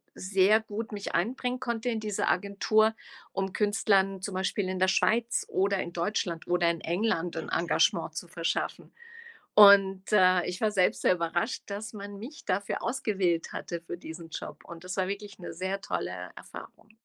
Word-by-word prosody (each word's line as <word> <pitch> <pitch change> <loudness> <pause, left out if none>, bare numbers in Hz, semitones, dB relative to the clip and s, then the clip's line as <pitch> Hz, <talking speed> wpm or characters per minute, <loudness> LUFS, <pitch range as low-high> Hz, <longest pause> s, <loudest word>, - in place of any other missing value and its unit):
sehr 195 +3 +3
gut 225 +2 -6
mich 205 -1 -5
einbringen 250 +7 -1
konnte 235 -1 -2
in 225 -2 -1
dieser 210 -2 -1
Agentur, 210 +3 +2 0.4
um 195 -1 -3
Künstlern 200 -2 +2
zum 200 +1 -4
Beispiel 190 +1 -1
in 185 0 -3
der 185 - +3
Schweiz 230 +4 +2
oder 195 0 +1
in 170 - -4
Deutschland 170 -2 -2
oder 175 -1 +2
in 170 -1 -2
England 175 -1 -1
'n 160 - -4
Engagement 170 0 +1
zu - - -5
verschaffen. - - -3 0.6
Und, 195 -1 +7
äh, 185 -3 +5
ich 180 - -4
war 220 - +2
selbst 190 -3 +2
sehr - - +4
überrascht, 175 +6 -2
dass 210 +3 -6
man 200 -1 -8
mich 280 +9 -10
dafür 200 +2 -1
ausgewählt 195 -9 0
hatte 170 -1 -5
für 170 +1 -7
diesen 165 -1 -9
Job. - - -7
Und 170 0 -11
das 185 0 -5
war 185 -1 0
wirklich 200 0 -6
'ne 175 - -7
sehr 190 +3 -3
tolle - - -4
Erfahrung. 215 - -12
195 Hz, 170 wpm, -28 LUFS, 180-215 Hz, 0.6 s, Und